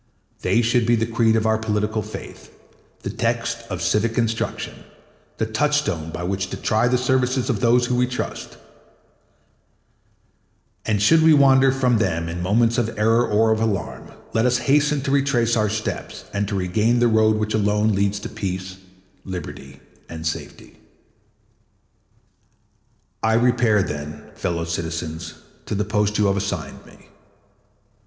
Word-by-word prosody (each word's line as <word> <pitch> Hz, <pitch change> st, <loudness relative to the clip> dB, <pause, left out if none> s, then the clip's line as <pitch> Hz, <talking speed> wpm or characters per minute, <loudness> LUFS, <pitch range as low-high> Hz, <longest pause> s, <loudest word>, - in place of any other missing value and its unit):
They 120 Hz, -, +2 dB
should 115 Hz, 0 st, +2 dB
be 120 Hz, -, +4 dB
the 115 Hz, 0 st, 0 dB
creed 115 Hz, -1 st, +2 dB
of 110 Hz, -1 st, +1 dB
our 110 Hz, 0 st, +2 dB
political 110 Hz, 0 st, -1 dB
faith, 105 Hz, +1 st, -10 dB, 0.5 s
the -, -, -3 dB
text 115 Hz, 0 st, -1 dB
of 90 Hz, -3 st, -4 dB
civic 105 Hz, +6 st, +1 dB
instruction, 115 Hz, -2 st, -2 dB, 0.5 s
the 110 Hz, -, 0 dB
touchstone 110 Hz, -, 0 dB
by 85 Hz, +2 st, -6 dB
which 95 Hz, 0 st, -2 dB
to -, -, -5 dB
try 110 Hz, +2 st, +1 dB
the 125 Hz, +1 st, +2 dB
services 130 Hz, 0 st, +1 dB
of 110 Hz, -, -2 dB
those 120 Hz, +2 st, +3 dB
we 125 Hz, 0 st, +1 dB
trust; 125 Hz, -, -5 dB, 2.3 s
and 105 Hz, -2 st, +1 dB
should 160 Hz, +11 st, +5 dB
we 160 Hz, -1 st, +6 dB
wander 135 Hz, -1 st, +5 dB
from 125 Hz, -3 st, +2 dB
them 85 Hz, -5 st, -1 dB
in 85 Hz, +1 st, -5 dB
moments 115 Hz, +5 st, +2 dB
of 115 Hz, -2 st, -2 dB
error 115 Hz, +3 st, +3 dB
or 110 Hz, +1 st, +3 dB
of 110 Hz, 0 st, +1 dB
alarm, 110 Hz, -4 st, -3 dB, 0.2 s
let 115 Hz, +2 st, +2 dB
us 125 Hz, -1 st, +2 dB
hasten 145 Hz, +3 st, +2 dB
to 135 Hz, -, -2 dB
retrace 135 Hz, -4 st, +2 dB
our 105 Hz, -2 st, +1 dB
steps 110 Hz, +1 st, -4 dB
and 100 Hz, 0 st, -1 dB
to 100 Hz, -, -3 dB
regain 105 Hz, +6 st, +1 dB
the 120 Hz, 0 st, +4 dB
road 110 Hz, -1 st, +3 dB
which 110 Hz, 0 st, -2 dB
alone 105 Hz, 0 st, +2 dB
leads 100 Hz, +1 st, 0 dB
to -, -, -5 dB
peace, 95 Hz, -1 st, -5 dB, 0.5 s
liberty, 95 Hz, -2 st, -8 dB, 0.3 s
and 80 Hz, -1 st, -7 dB
safety. 80 Hz, -, -6 dB, 2.4 s
4 110 Hz, -, +1 dB
I -, -, +3 dB
repair, 120 Hz, -3 st, +3 dB
then, 75 Hz, -2 st, -7 dB
fellow 85 Hz, -2 st, -2 dB
citizens, 80 Hz, -1 st, -4 dB, 0.3 s
to -, -, -2 dB
the 105 Hz, 0 st, -1 dB
post 105 Hz, 0 st, 0 dB
you 105 Hz, -, +2 dB
have 100 Hz, 0 st, +2 dB
assigned 90 Hz, -8 st, -4 dB
me. -, -, -19 dB
110 Hz, 155 wpm, -22 LUFS, 100-120 Hz, 2.4 s, we